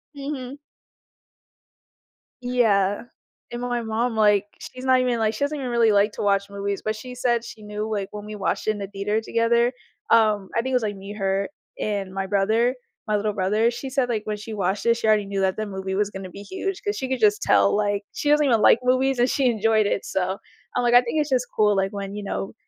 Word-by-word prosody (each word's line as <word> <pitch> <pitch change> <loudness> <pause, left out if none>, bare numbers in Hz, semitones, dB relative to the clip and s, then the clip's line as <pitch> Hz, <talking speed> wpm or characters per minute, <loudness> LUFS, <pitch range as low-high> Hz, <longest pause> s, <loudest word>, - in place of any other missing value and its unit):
Mhm. 275 -1 -6 1.8
Yeah. 215 -6 +2 0.5
And 240 - -5
my 245 -1 -1
mom, 225 +1 -1
like, 210 -2 +4
she's 255 +1 -9
not 260 -1 +5
even, 250 -2 +1
like 220 -1 +1
she 280 - -3
doesn't 295 +1 -1
even 260 -3 -4
really 230 -2 +4
like 205 +1 +3
to - - -6
watch 200 -1 +1
movies, 200 0 -3
but 215 0 0
she 250 +3 -9
said 240 -2 +1
she 215 -2 -10
knew, 210 +1 -4
like, 205 -3 -2
when 210 0 -7
we 215 0 -7
watched 200 +1 -2
it - - +4
in 210 - -5
the 200 -1 -5
theater 205 +2 -2
together, 235 +2 +2 0.4
um, 215 -4 +3
I - - +3
think 260 +2 -3
it - - +1
was, 250 - +2
like, 205 -2 -2
me, 195 +1 -8
her 195 -1 -1 0.3
and 200 -3 -2
my 195 0 -3
brother, 220 +5 +2 0.3
my 210 - +1
little 210 0 0
brother. 210 +5 +1
She 240 +3 -6
said, 265 -1 0
like, 220 -3 -1
when 210 -1 -3
she 220 +2 -8
watched 195 0 -1
it, 235 0 +4
she 225 - -2
already 215 -1 +3
knew 195 0 -2
that 190 +1 +1
the 215 - -2
movie 190 -1 -4
was 205 0 0
gonna 190 -2 -7
be 200 +3 -10
huge 385 - -4
'cause 410 0 -1
she 260 - -3
could 260 - -1
just 210 -2 +3
tell, 100 0 +4
like, 205 -1 0
she 290 - -2
doesn't 295 0 +4
even 230 -5 +3
like 225 - +6
movies 260 +1 +2
and 245 +1 +3
she 270 -2 +2
enjoyed 220 -1 +2
it, - - -1
so, 190 0 -1 0.4
I'm - - +1
like, 240 0 +2
I 245 - +8
think 250 +6 -2
it's 300 -1 0
just 250 -2 +1
cool, 210 -1 +3
like, 195 0 0
when, 200 -1 -5
you 210 - -5
know, 195 - -4
215 Hz, 240 wpm, -24 LUFS, 200-245 Hz, 1.8 s, I